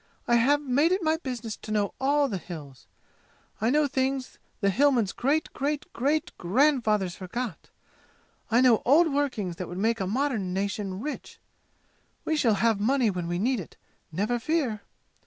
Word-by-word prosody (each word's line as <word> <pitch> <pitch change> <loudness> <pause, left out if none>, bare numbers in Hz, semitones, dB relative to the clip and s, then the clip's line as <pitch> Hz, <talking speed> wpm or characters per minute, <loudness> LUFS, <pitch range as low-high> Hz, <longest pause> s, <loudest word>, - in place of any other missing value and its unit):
"I 240 - +4
have 285 +5 +3
made 285 +5 +2
it 375 0 +1
my 315 0 +2
business 245 -7 -5
to - - -11
know 205 -1 0
all 285 +1 +3
the 200 -7 -3
'Hills.' 150 -7 -10 0.7
I 225 - +2
know 300 +3 +3
things 265 -1 -2 0.2
the 200 -2 +2
Hillmen's 250 -4 +3
great 290 +5 0
great 290 +2 -2
great 305 +7 0
grand 260 - +3
fathers 205 -5 0
forgot! 205 +2 -5 0.8
I 235 +2 +4
know 245 -4 +5
old 310 +4 +4
workings 225 -12 -1
that 180 - -5
would 175 - -7
make 225 +4 +1
a 190 - -1
modern 220 -5 -1
nation 195 0 -3
rich! 300 +4 -6 0.9
We 315 - +1
shall 235 -8 +3
have 225 0 +2
money 245 +1 +2
when 180 -2 -4
we 175 0 -1
need 240 +5 +1
it, 180 - -10 0.3
never 210 +9 -1
fear! 255 -6 -1
240 Hz, 170 wpm, -27 LUFS, 200-280 Hz, 0.9 s, know